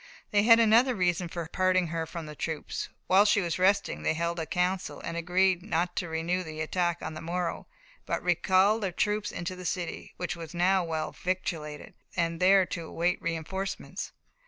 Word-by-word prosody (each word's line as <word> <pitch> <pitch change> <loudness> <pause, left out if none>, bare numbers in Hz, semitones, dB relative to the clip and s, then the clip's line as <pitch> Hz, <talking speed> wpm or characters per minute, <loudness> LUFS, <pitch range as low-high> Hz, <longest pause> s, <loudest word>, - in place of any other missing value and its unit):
They 205 -2 +4
had 230 +2 +7
another 230 +3 +5
reason 180 -2 +1
for 170 -1 -4
parting 185 0 +2
her 165 0 -2
from 165 0 -6
the 150 0 -8
troops. 160 0 -4 0.2
While 190 +2 +6
she 205 0 +4
was 175 -2 -2
resting 185 - +2
they 155 - +1
held 170 +1 -1
a 160 - -3
council, 180 +1 -1
and 170 - -5
agreed 180 +2 +2
not 175 -2 -1
to 175 - -2
renew 165 +3 -1
the 155 -3 -7
attack 175 +2 -1
on - - -4
the 155 - -7
morrow, 175 +1 -3 0.4
but - - -1
recall 185 +4 +3
the 195 -4 -2
troops 210 +3 0
into 185 +1 -4
the 180 - -9
city, 175 -1 -4
which 180 0 -3
was 165 0 -8
now 185 +2 +3
well 160 -2 -2
victualled, 165 -5 -4 0.3
and 165 -1 0
there 190 0 +5
await 170 +2 -1
reinforcements. 170 +4 -4
180 Hz, 180 wpm, -29 LUFS, 165-190 Hz, 0.4 s, had